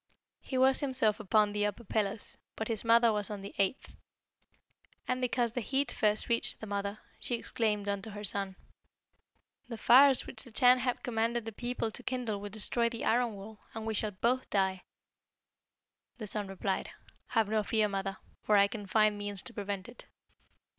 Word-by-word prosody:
He 260 - -4
was 260 +1 +5
himself 255 -7 +2
upon 210 +1 +2
the 205 0 -1
upper 205 +3 -6
pillars, 210 -1 -2 0.2
but 220 - -4
his 225 -3 -2
mother 230 0 +5
was 210 -1 -2
on 205 -2 -6
the 200 - -8
eighth. 200 +7 -1 1.1
And 255 0 -1
because 245 -2 0
the 245 - -3
heat 270 +5 0
first 210 -1 +1
reached 235 -1 +1
the - - -7
mother, 200 0 -3 0.2
she 245 - -1
exclaimed 215 -3 -1
unto 200 +1 -3
her 205 0 -8
son, 195 -1 -2 1.1
'The 230 - -5
fires 265 +4 +6
which 220 - +2
the - - -9
Chan 250 +3 +5
has 250 -1 0
commanded 230 -1 -1
the 225 - -5
people 240 0 -3
to - - -8
kindle 240 -5 -3
will 205 - -6
destroy 230 +3 +1
the 230 -1 -5
iron 235 -2 +2
wall, 205 +2 -10 0.2
and 220 -1 -5
we 220 - -1
shall 215 0 0
both 235 +6 -1
die.' 190 -2 +1 1.4
The 220 - -6
son 205 -1 -3
replied, 195 0 -2 0.4
'Have 225 -3 +1
no 215 +1 +1
fear, 215 0 +1
mother, 195 -1 -3 0.2
for 210 - +3
I 200 0 +6
can 205 -1 -7
find 215 0 +3
means 205 -2 -3
to 255 - -7
prevent 200 -2 -4
it.' 240 - -12
220 Hz, 180 wpm, -31 LUFS, 205-240 Hz, 1.4 s, fires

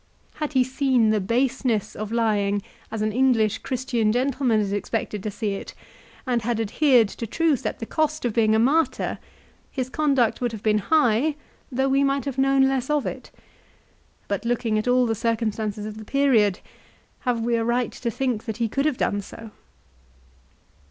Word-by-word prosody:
Had 300 -1 -3
he 260 -1 +4
seen 255 -3 +2
the 215 - +2
baseness 240 +1 0
of 215 0 -5
lying 205 -3 +1 0.3
as 220 -1 -3
an 215 - 0
English 230 -3 +2
Christian 240 -4 -1
gentleman 250 -1 +1
is 200 -1 -1
expected 205 0 -3
to 215 - -3
see 205 0 -3
it, 195 - -7 0.5
and 245 -3 0
had 230 0 -1
adhered 235 +1 +3
to 230 - -6
truth 315 +1 +1
at - - -4
the 225 - -5
cost 310 +1 -1
of 235 - 0
being 220 -1 +3
a - - +4
martyr, 265 +3 +1 0.5
his 260 -1 -4
conduct 275 -8 +1
would 240 -2 -1
have 215 - -8
been 215 -1 +3
high 285 +2 +2 0.4
though 265 +2 +1
we 275 +1 +3
might 275 0 0
have 270 -2 -3
known 270 0 +4
less 265 -1 -1
of 300 -2 +1
it; - - -6 1.0
but - - -2
looking 235 -2 0
at 215 - -4
all 250 0 +4
the 225 - 0
circumstances 215 -2 -2
of 215 0 -7
the - - -8
period 225 -6 +2 0.6
have 245 -3 -1
we 235 +1 +1
a 230 - 0
right 240 +1 0
to 235 - -4
think 240 -1 -2
that 220 -1 -4
he 235 -1 0
could 275 +6 -1
have 290 -5 -1
done 205 - 0
so 225 +2 -11
235 Hz, 185 wpm, -24 LUFS, 215-265 Hz, 1.0 s, he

